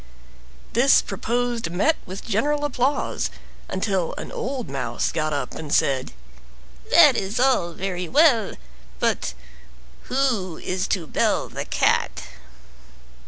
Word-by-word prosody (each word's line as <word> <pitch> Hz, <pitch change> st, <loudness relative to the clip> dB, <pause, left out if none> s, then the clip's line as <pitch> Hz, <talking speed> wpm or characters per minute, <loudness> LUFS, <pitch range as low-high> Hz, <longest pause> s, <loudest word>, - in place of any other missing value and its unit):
This 265 Hz, +4 st, +6 dB
proposed 235 Hz, +1 st, -2 dB
met 200 Hz, -, +2 dB
with 185 Hz, +2 st, -7 dB
general 290 Hz, +7 st, 0 dB
applause, 275 Hz, 0 st, 0 dB, 0.4 s
until 190 Hz, -2 st, -1 dB
an -, -, -6 dB
old 255 Hz, -1 st, -4 dB
mouse 130 Hz, -4 st, -2 dB
got 155 Hz, -1 st, -1 dB
up 145 Hz, -1 st, -3 dB
and 150 Hz, -2 st, -7 dB
said: 135 Hz, -3 st, +1 dB, 0.8 s
"That -, -, +7 dB
is 200 Hz, +5 st, -2 dB
all 250 Hz, -10 st, +2 dB
very 180 Hz, -1 st, -4 dB
well, 275 Hz, -8 st, +4 dB, 0.4 s
but 65 Hz, -, 0 dB, 0.7 s
who 235 Hz, -11 st, 0 dB
is 185 Hz, 0 st, -2 dB
to 180 Hz, -4 st, -1 dB
bell -, -, 0 dB
the -, -, -5 dB
Cat?" -, -, +1 dB
195 Hz, 115 wpm, -23 LUFS, 170-255 Hz, 0.8 s, That